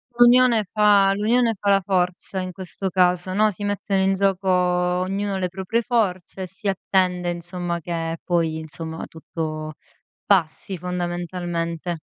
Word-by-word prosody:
L'unione 240 -2 +5
fa 200 -1 +4
l'unione 230 +2 +2
fa 200 +1 -1
la 195 0 +5
forza 185 0 -1
in 185 0 -5
questo 190 +1 -4
caso, 180 0 +2
no, 215 +2 +3
si 205 +1 -7
mettono 200 -1 0
in 195 0 +3
gioco 195 0 0
ognuno 180 +2 +1
le 185 -1 -1
proprie 190 +5 -2
forze 195 -6 -1
e - - -5
si 195 +4 -8
attende, 185 -2 +1
insomma, 175 0 -4
che 165 0 -3
poi, 165 -3 0
insomma, 160 +1 -5
tutto 155 -1 -6 0.5
passi 185 0 +1
fondamentalmente. 175 -1 -3
185 Hz, 140 wpm, -23 LUFS, 175-200 Hz, 0.5 s, L'unione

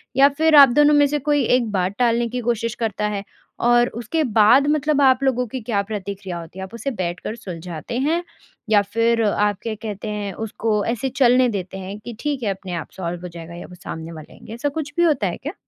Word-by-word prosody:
या 275 +2 +7
फ़िर 320 0 +4
आप 280 -2 +10
दोनों 295 +4 +4
में 290 0 +5
से 295 +1 -1
कोई 290 0 +1
एक 235 -4 -2
बात 190 0 -1
टालने 235 -1 +2
की 250 +2 -3
कोशिश 230 0 -1
करता 210 -1 -1
है? 205 -1 -3 0.4
और 240 0 +4
उसके 240 +8 -1
बाद 230 +3 +5
मतलब 295 -1 +2
आप 265 -1 +4
लोगों 250 -2 +1
की 255 +3 -6
क्या 215 -3 0
प्रतिक्रिया 200 -3 -5
होती 170 +3 -10
है - - -4
आप 190 - -10
उसे 235 +4 -3
बैठ 180 -6 -3
कर 215 - -5
सुलझाते 180 0 -6
हैं 320 +6 +1 0.5
या 210 -2 +5
फ़िर 230 +3 +1
आप 205 -1 +1
क्या 225 -2 -3
कहते 210 -1 -5
हैं 205 -2 -4
उसको 215 -1 -1
ऐसे 240 +3 -1
चलने 250 0 +5
देते 190 -3 -4
हैं 190 +2 -6
कि 235 +2 -9
ठीक 285 -3 -2
है 210 - 0
अपने 190 -1 -7
आप 170 - -5
सॉल्व 175 -1 -4
हो 180 - -6
जाएगा 170 -1 -10
या 175 - -9
वो 180 - -12
सामने 160 -3 -6
वाले 155 -2 -11
आएँगे? - - -11
ऐसा 240 +5 -2
कुछ 290 0 -5
भी 345 - +4
होता 300 - +2
है 175 - -4
क्या? 295 +5 -6
225 Hz, 235 wpm, -21 LUFS, 195-265 Hz, 0.5 s, आप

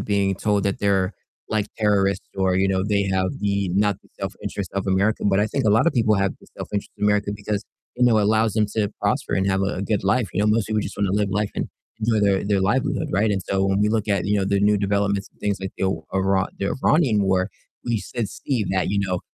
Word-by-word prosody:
being 100 -2 +1
told 105 +1 0
that 100 -1 -1
they're 100 -1 +1 0.4
like 110 -2 0
terrorists, 100 -2 +1
or, 95 -1 +2
you 95 +1 +2
know, 95 -1 +1
they 100 -1 +2
have 95 -1 +1
the 100 -2 0
not 100 0 +2
the - - -24
self - - -3
interest 100 -3 -4
of 100 0 -2
America. 100 +3 +1
But 95 -1 +3
I 105 - +2
think 110 - -2
a 105 - +4
lot 115 +9 +4
of - - +4
people 110 -3 +3
have 100 -1 +1
the - - -18
self - - -6
interest 100 - -3
of - - -10
America 105 -1 +2
because, 105 0 -3 0.3
you 125 - +3
know, 115 -3 +5
it - - +3
allows 110 +1 +2
them 110 -1 +2
to 105 -2 +1
prosper - - 0
and 95 0 +1
have 95 - +1
a 95 - -1
a - - -2
good 100 -1 -1
life, 105 +3 +2
you 100 - -1
know, 105 - +2
most 105 0 +2
people 110 -1 0
just 100 - -6
wanna 100 -2 0
live 105 0 +1
life 105 +1 0
and - - -2 0.3
enjoy 110 -1 +2
their 100 -1 +2
their 100 -1 +1
livelihood, 130 +10 0
right, 105 +2 +2
and, 100 -2 -1
so, 95 0 0
when 95 +1 +1
we 105 - +3
look 110 -1 0
at, 100 -3 +1
you 105 +1 +1
know, 95 - +1
the 100 0 +1
new 105 +1 +4
developments 100 0 0
and - - -34
things 100 -1 -1
like 95 0 -5
the - - -1 0.3
Ira 95 0 +2
the 100 - -1
Iranian 130 -11 +3
war, 95 0 +1 0.4
we 115 -3 -1
s 110 -4 -3
see 125 -6 +1
that, 95 -1 0
you 100 - 0
know, 90 -2 -1
100 Hz, 260 wpm, -23 LUFS, 95-105 Hz, 0.4 s, know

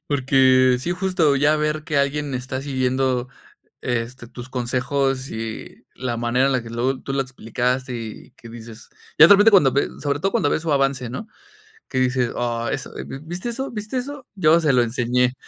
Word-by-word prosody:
Porque 130 -2 +4
sí, 170 - -3
justo 180 -6 +1
ya 150 +2 +3
ver 150 0 -1
que 155 -2 -2
alguien 140 0 -1
está 130 +1 -4
siguiendo, 130 -2 0 0.5
este, 120 0 -3
tus 120 +2 -10
consejos 130 +2 -1
y 110 0 -7
la 120 -2 -3
manera 120 +3 +1
en 140 - +1
la 130 -2 +1
que 115 - -9
luego 125 +3 -1
tú 135 - -5
lo 135 - +1
explicaste 125 0 -2
y 115 -2 -8
que 115 - -15
dices 115 0 -11 0.3
ya 155 - +10
de - - +9
repente 205 +3 +6
cuando 160 -10 +6
ve 140 - +1
sobre 145 0 -1
todo 195 +5 0
cuando 145 - +1
ves - - 0
su 160 - -1
avance, 135 -3 0
¿no?, 205 - -6 0.6
que 130 - -1
dices: 125 -1 +1
"Oh, 120 -1 -2
eso, 135 - -5
¿vi 135 - -7
viste 175 +8 -5
eso? 265 +3 -4
¿Viste 215 +2 -4
eso?, 275 +1 -5
yo 165 -3 +4
se 150 - +3
lo 125 - +4
enseñé". 125 +1 0
130 Hz, 195 wpm, -22 LUFS, 125-150 Hz, 0.6 s, ya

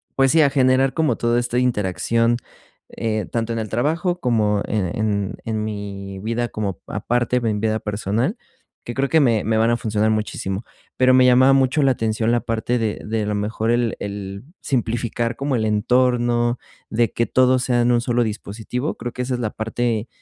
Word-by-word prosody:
pues 135 0 +4
sí, 160 - +5
a 145 - +5
generar 130 0 +3
como 160 -2 +1
todo 120 0 +1
esta 120 0 -2
interacción 115 0 +1 0.5
eh, 110 -2 -2
tanto 115 0 -1
en - - -3
el 110 - -3
trabajo 165 - 0
como 110 - +1
en 105 -3 0
en 100 -3 -1
en 110 -1 -2
mi 100 -2 -6
vida 115 +3 -2
como 100 -5 -4
aparte 120 +1 0
en 125 - -2
mi 110 -2 +1
vida 110 0 0
personal, 110 - -1 0.5
que 120 - -5
creo 135 +3 0
que 160 - +4
me 115 -6 +2
me 110 +1 +1
van 115 +1 +3
a 120 - +2
funcionar 110 -1 0
muchísimo. 105 -2 -2 0.3
Pero 130 0 +5
me 130 0 +6
llamaba 130 +2 +6
mucho 135 +2 +3
la 135 - +4
atención 110 -1 0
la 120 - +2
parte 115 +2 -1
de 110 -2 -2
de 110 +1 -1
a - - -2
lo 105 - -1
mejor 110 +2 -1
el 120 -2 +1
el 100 0 -6 0.2
simplificar 120 -1 -1
como 140 -1 -1
el 110 -2 0
entorno, 120 +2 +2 0.3
de 115 0 +1
que 115 - +1
todo 130 +1 +3
sea 125 -1 +1
en 120 +1 +3
un 120 - +2
solo 120 0 +1
dispositivo. 110 +5 -4
Creo 120 - -5
que 125 - -3
esa 125 0 -1
es - - -5
la 110 -2 -2
parte 115 0 -2
115 Hz, 200 wpm, -21 LUFS, 110-125 Hz, 0.5 s, me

